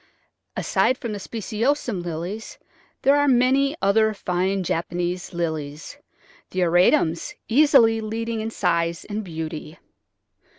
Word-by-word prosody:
Aside 255 - +1
from 235 -5 -5
the 205 - -4
speciosum 230 +1 -2
Lilies 175 +6 -5 0.5
there 275 +1 +5
are 290 0 +3
many 270 +3 +3
other 220 +2 +3
fine 185 +1 -1
Japanese 175 +2 -2
Lilies, 155 -4 -4 0.5
the 185 - -2
auratums 175 - +2
easily 235 -4 +5
leading 225 +1 -3
in 220 - -3
size 170 -5 -1
and 215 +1 -4
beauty. 160 -2 -6
200 Hz, 115 wpm, -23 LUFS, 170-230 Hz, 0.5 s, there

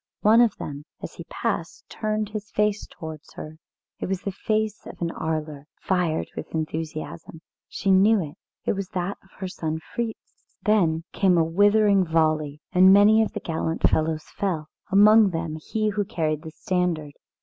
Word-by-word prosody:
One 220 +3 +6
of 235 -4 +3
them, 145 0 -7 0.2
as - - -6
he - - -9
passed, - - -3
turned 215 -1 -2
his 215 0 -6
face 210 0 0
towards 160 -4 -10
her; 155 +1 -9 0.4
it - - -3
was 190 -1 -2
the 200 - -2
face 215 +2 -2
of - - -10
an 170 -1 -1
Arler, 155 -3 -4
fired 180 -4 0
with - - -7
enthusiasm, 155 - -5 0.3
she 195 - -1
knew 200 +3 +5
it; 155 -3 -5 0.3
it - - +2
was 195 -2 -4
that 180 +2 -2
of 190 - -24
her 190 - -4
son 160 -3 -3 0.2
Fritz. 230 -2 -6
Then 170 -7 +2
came 185 -3 +3
a 165 - +4
withering 205 +3 +4
volley, 155 -3 0
and 185 0 +7
many 205 +3 +7
of 220 - -1
the - - -3
gallant 160 0 0
fellows 155 0 0
fell, 165 -6 -3 0.2
among 210 +2 +7
them 165 -2 -3
he 215 +7 -1
who 205 0 0
carried 155 -5 -2
the 160 - -8
standard. 165 -3 -2
180 Hz, 170 wpm, -24 LUFS, 160-205 Hz, 0.4 s, and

